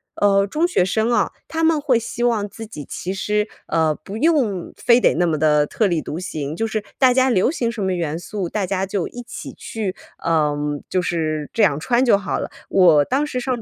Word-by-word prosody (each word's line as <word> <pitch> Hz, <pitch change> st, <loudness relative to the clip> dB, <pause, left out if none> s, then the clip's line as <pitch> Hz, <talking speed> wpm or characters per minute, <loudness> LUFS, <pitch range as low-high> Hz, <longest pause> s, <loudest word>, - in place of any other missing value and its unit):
呃， 200 Hz, -1 st, +3 dB
中 320 Hz, -, +1 dB
学 270 Hz, -, +2 dB
生 220 Hz, +5 st, 0 dB
哦， -, -, +2 dB, 0.2 s
他 325 Hz, 0 st, -2 dB
们 320 Hz, -1 st, +3 dB
会 275 Hz, -5 st, +2 dB
希 235 Hz, +1 st, -4 dB
望 220 Hz, -4 st, +1 dB
自 225 Hz, -, -9 dB
己 150 Hz, -9 st, -8 dB
其 185 Hz, -, -5 dB
实， 210 Hz, +2 st, 0 dB, 0.2 s
呃， 160 Hz, -2 st, +2 dB
不 195 Hz, +7 st, -8 dB
用 250 Hz, -, +1 dB
非 240 Hz, 0 st, +4 dB
得 -, -, +3 dB
那 175 Hz, +2 st, +2 dB
么 160 Hz, -3 st, 0 dB
地 150 Hz, -1 st, +3 dB
特 210 Hz, +7 st, 0 dB
立 170 Hz, -3 st, 0 dB
独 160 Hz, -, -5 dB
行， 155 Hz, -4 st, -4 dB
就 225 Hz, -, 0 dB
是 215 Hz, -1 st, -3 dB
大 260 Hz, -2 st, +5 dB
家 260 Hz, +1 st, +3 dB
流 225 Hz, 0 st, +3 dB
行 235 Hz, -8 st, -1 dB
什 225 Hz, -3 st, -6 dB
么 190 Hz, -1 st, 0 dB
元 165 Hz, -3 st, -2 dB
素， 185 Hz, -1 st, -4 dB
大 210 Hz, -3 st, -1 dB
家 190 Hz, +1 st, -1 dB
就 190 Hz, -2 st, -2 dB
一 245 Hz, -, -8 dB
起 -, -, -8 dB
去， 210 Hz, -5 st, -5 dB, 0.3 s
嗯， 150 Hz, -3 st, 0 dB
就 185 Hz, -, +1 dB
是 155 Hz, -4 st, -2 dB
这 225 Hz, -, +2 dB
样 150 Hz, -7 st, +3 dB
穿 240 Hz, +9 st, +2 dB
就 235 Hz, -6 st, +5 dB
好 200 Hz, -, -3 dB
了。 -, -, -5 dB, 0.2 s
我 165 Hz, -6 st, +5 dB
当 275 Hz, +3 st, 0 dB
时 255 Hz, -4 st, -3 dB
上 250 Hz, -2 st, -2 dB
200 Hz, 240 characters per minute, -21 LUFS, 165-240 Hz, 0.3 s, 大